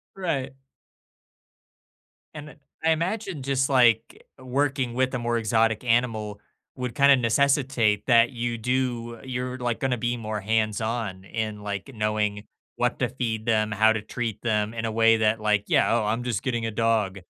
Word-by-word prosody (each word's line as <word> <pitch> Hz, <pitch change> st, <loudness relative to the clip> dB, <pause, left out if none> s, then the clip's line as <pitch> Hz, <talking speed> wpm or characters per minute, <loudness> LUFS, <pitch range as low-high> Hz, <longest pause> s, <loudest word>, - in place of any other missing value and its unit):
Right. 140 Hz, -8 st, -2 dB, 1.8 s
And, 150 Hz, -1 st, -9 dB
uh, -, -, -15 dB, 0.3 s
I 160 Hz, -, +3 dB
imagine 175 Hz, -2 st, -2 dB
just 135 Hz, 0 st, 0 dB
like, 120 Hz, -4 st, +2 dB
working 130 Hz, -1 st, -1 dB
with 130 Hz, +1 st, 0 dB
a 125 Hz, -, -1 dB
more 120 Hz, 0 st, 0 dB
exotic 110 Hz, 0 st, +1 dB
animal 115 Hz, -4 st, 0 dB, 0.4 s
would 125 Hz, -1 st, -5 dB
kinda 140 Hz, -1 st, +6 dB
necessitate 125 Hz, -3 st, +2 dB
that 115 Hz, +1 st, +5 dB
you 120 Hz, -1 st, -3 dB
do 120 Hz, -1 st, -2 dB
you're, 125 Hz, 0 st, -4 dB
like, 120 Hz, -2 st, -2 dB
gonna 130 Hz, -2 st, 0 dB
be 120 Hz, +1 st, -1 dB
more 110 Hz, -2 st, -4 dB
hands-on 110 Hz, -2 st, -1 dB
in, 110 Hz, -1 st, -4 dB
like, 100 Hz, +4 st, -5 dB
knowing 105 Hz, -1 st, -1 dB, 0.3 s
what 125 Hz, +1 st, 0 dB
to 125 Hz, -3 st, 0 dB
feed 115 Hz, -4 st, -3 dB
them, 110 Hz, -2 st, +1 dB
how 110 Hz, +2 st, +4 dB
to 110 Hz, -, -3 dB
treat 115 Hz, 0 st, -4 dB
them 105 Hz, -1 st, 0 dB
in 115 Hz, 0 st, -3 dB
a 110 Hz, -, -2 dB
way 115 Hz, 0 st, +4 dB
that 110 Hz, 0 st, +1 dB
like, 105 Hz, -1 st, +1 dB
"Yeah, -, -, +3 dB
oh, 110 Hz, -3 st, +1 dB
I'm 115 Hz, +3 st, -1 dB
just 120 Hz, -5 st, -2 dB
getting 120 Hz, -4 st, -1 dB
a 110 Hz, -, -2 dB
dog." 105 Hz, -3 st, 0 dB
115 Hz, 165 wpm, -25 LUFS, 110-130 Hz, 1.8 s, kinda